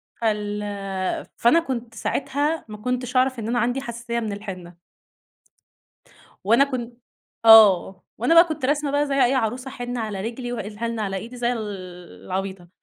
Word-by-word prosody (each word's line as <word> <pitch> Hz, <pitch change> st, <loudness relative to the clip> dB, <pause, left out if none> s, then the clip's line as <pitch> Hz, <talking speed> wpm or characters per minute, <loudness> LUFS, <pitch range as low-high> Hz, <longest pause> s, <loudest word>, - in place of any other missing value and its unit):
فال 210 Hz, -2 st, -1 dB, 0.8 s
فأنا 240 Hz, +9 st, +4 dB
كنت 245 Hz, -7 st, -5 dB
ساعتها، 290 Hz, +7 st, -1 dB
ما 215 Hz, -, -7 dB
كنتش 250 Hz, +3 st, -3 dB
أعرَف 260 Hz, 0 st, +2 dB
إن 225 Hz, 0 st, -4 dB
أنا 240 Hz, -, 0 dB
عَندي 245 Hz, +3 st, 0 dB
حساسية 235 Hz, -1 st, -4 dB
من 220 Hz, -3 st, -3 dB
الحِنّة. 185 Hz, -4 st, -8 dB, 1.7 s
وأنا 230 Hz, +7 st, +5 dB
كن 245 Hz, -4 st, -5 dB, 0.5 s
آه، 200 Hz, -4 st, +7 dB, 0.2 s
وأنا 245 Hz, +9 st, +2 dB
بقى 335 Hz, +1 st, +9 dB
كنت 315 Hz, -5 st, -5 dB
راسمة 290 Hz, +1 st, +1 dB
بقى 290 Hz, +1 st, +1 dB
زي 280 Hz, -, -2 dB
أي 250 Hz, -, +2 dB
عروسة 255 Hz, +2 st, -1 dB
حِنّة 245 Hz, -1 st, -5 dB
على 215 Hz, -3 st, -4 dB
رِجلي، 240 Hz, +4 st, -5 dB
وال 210 Hz, -3 st, -6 dB
حِنّة 230 Hz, -1 st, -2 dB
على 195 Hz, -2 st, -2 dB
إيدي 230 Hz, +6 st, -7 dB
زي 240 Hz, 0 st, 0 dB
ال 235 Hz, -, -3 dB, 0.6 s
العبيطة. 190 Hz, -1 st, -4 dB
235 Hz, 160 wpm, -23 LUFS, 210-255 Hz, 1.7 s, بقى